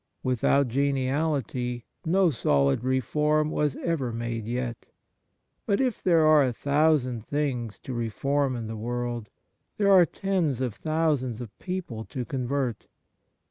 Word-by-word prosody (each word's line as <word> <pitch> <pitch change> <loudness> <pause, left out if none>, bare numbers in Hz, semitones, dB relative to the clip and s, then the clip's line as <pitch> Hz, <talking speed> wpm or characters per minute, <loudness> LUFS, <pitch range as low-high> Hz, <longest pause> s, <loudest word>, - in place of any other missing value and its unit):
Without 130 +2 +2
geniality 135 -2 -1 0.2
no 180 +1 +3
solid 70 - +2
reform 150 +4 +1
was 150 -4 0
ever 145 -8 -1
made 115 -1 -4
yet. 120 0 -3 0.8
But 200 - +2
if 255 -5 0
there 165 -4 +4
are 155 -2 +6
a 130 - +1
thousand 140 -4 +1
things 130 -7 -2
to 130 - -6
reform 130 +4 0
in 115 -2 -4
the 110 - -5
w 110 +2 -5
orld, 120 -2 -3 0.5
there 200 -1 +3
are 180 -3 +7
tens 180 - -1
of 125 -4 -1
thousands 150 -4 0
of 120 -4 -8
people 180 - -4
to 125 -2 -5
convert. 130 -2 -2
130 Hz, 140 wpm, -27 LUFS, 120-155 Hz, 0.8 s, are